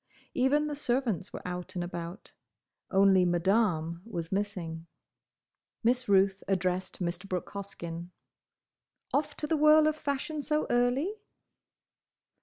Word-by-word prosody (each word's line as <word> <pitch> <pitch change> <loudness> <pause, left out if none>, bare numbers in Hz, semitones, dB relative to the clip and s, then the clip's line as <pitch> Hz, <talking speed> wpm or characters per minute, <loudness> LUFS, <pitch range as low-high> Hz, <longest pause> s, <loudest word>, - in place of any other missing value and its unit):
Even 285 +4 +3
the 300 -1 -3
servants 240 - -1
were - - -7
out 180 +1 -5
and 175 - -1
about; 175 +2 -7 0.6
only 195 -1 +5
Madame 175 -2 +1
was 170 -7 -5
missing. 180 -5 -3 1.0
Miss 245 +1 +2
Ruth 195 0 +4
addressed 185 -1 -1
Mr. 175 +3 -3
Brooke 180 -1 -3
Hoskyn. 175 -4 -6 1.0
"Off 295 - 0
to - - -1
the 320 - +1
whirl 305 +1 +7
of 310 0 +2
fashion 295 +1 -3
so 300 +1 0
early?" 245 +10 +2
195 Hz, 120 wpm, -30 LUFS, 175-265 Hz, 1.0 s, whirl